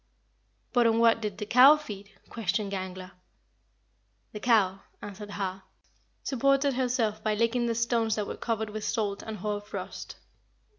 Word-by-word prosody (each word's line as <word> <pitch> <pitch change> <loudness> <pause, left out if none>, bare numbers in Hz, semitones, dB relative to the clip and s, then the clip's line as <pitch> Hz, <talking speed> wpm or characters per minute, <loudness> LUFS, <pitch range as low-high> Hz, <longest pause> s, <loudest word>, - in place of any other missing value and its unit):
"But 240 -2 +4
on 225 0 +2
what 230 0 +4
did 210 -3 -4
the 210 - -4
cow 260 +7 +7
feed?" 205 -8 -9 0.2
questioned 210 -2 -2
Gangler. 185 -1 -5 1.2
"The 210 - -7
cow," 205 -5 +3 0.2
answered 205 0 -8
Har, 195 -2 -4 0.6
"supported 275 +1 +2
herself 245 -4 0
by 215 -1 +1
licking 230 +2 +1
the 230 - 0
stones 230 -1 +1
that 210 - -2
were - - -5
covered 220 -2 -3
with 215 0 -5
salt 205 -3 -1
and 220 -1 -6
hoar 205 +1 -3
frost. 205 - -7
215 Hz, 150 wpm, -28 LUFS, 205-235 Hz, 1.2 s, cow